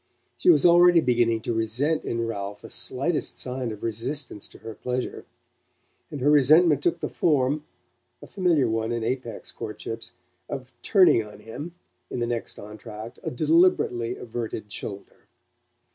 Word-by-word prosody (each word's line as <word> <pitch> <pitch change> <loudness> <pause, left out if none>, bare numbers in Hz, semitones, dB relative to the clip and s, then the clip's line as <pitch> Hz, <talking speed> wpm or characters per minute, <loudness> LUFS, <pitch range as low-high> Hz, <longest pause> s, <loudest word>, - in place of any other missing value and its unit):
She 360 - +2
was 345 - +6
already 175 0 +7
beginning 120 -5 +2
to 115 - -2
resent 120 +8 0
in 115 0 -2
Ralph 100 -2 -5
the - - -7
slightest 140 +6 +1
sign 125 -2 -2
of 105 - -9
resistance 115 +1 -2
to - - -15
her 110 0 -8
pleasure; 125 +3 -4 0.8
and 145 - -6
her 145 +3 +4
resentment 150 +1 +5
took 170 +2 0
the - - -1
form 145 -1 +1 0.5
a - - -11
familiar 170 -9 +1
one 110 0 -1
in 120 -1 -2
Apex 120 -2 -4
courtships 115 +2 -6 0.4
of 130 -2 -6
turning 185 - +5
on 105 0 -13
him, 145 +11 -8 0.3
in - - -4
the 120 - 0
next 120 -1 -4
entr'acte, 105 +2 -9
a - - -3
deliberately 145 -5 +2
averted 110 -3 -6
shoulder. 100 -1 -8
125 Hz, 150 wpm, -25 LUFS, 115-150 Hz, 0.8 s, already